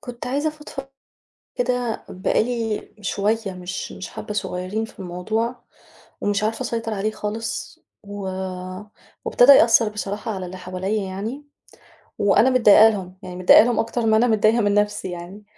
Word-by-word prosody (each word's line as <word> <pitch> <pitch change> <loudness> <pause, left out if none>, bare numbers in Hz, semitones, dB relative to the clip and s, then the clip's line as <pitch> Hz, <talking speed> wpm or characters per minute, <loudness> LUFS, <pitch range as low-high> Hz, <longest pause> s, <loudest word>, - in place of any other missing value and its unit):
كنت 245 -4 -8
عايزة 285 +5 0
أفضفض 300 -3 -8 0.7
كده 245 -2 -1
بقى 185 +3 0
لي 230 -3 -3
شوية 205 +1 -1
مش 180 0 -6
مش 185 - -8
حبة 210 - -7
صغيرين 200 +2 -3
في 225 - -17
الموضوع، 215 +7 -3 0.6
ومش 205 0 0
عارفة 220 +1 -1
أسيطر 230 -1 -3
عليه 210 +1 -1
خالص، 215 +1 -5 0.2
و 205 0 -8 1.0
وابتدأ 255 +3 +7
يأثر 230 -2 +5
بصراحة 210 +1 -4
على 185 -1 -5
اللي 185 +1 -8
حواليّا 185 +3 -3
يعني، 220 +10 -6 0.7
وأنا 205 +5 +4
متضايقة 225 -3 +7
لهم 190 -3 -5
يعني 180 -1 -8
متضايقة 180 +3 +7
لهم 240 0 0
أكتر 230 +1 -1
ما 220 -1 +4
أنا 240 +3 +3
متضايقة 220 +1 +3
من 205 -1 +2
نفسي 205 -2 0
يعني، 175 +4 -9
215 Hz, 150 wpm, -22 LUFS, 195-230 Hz, 1.0 s, وابتدأ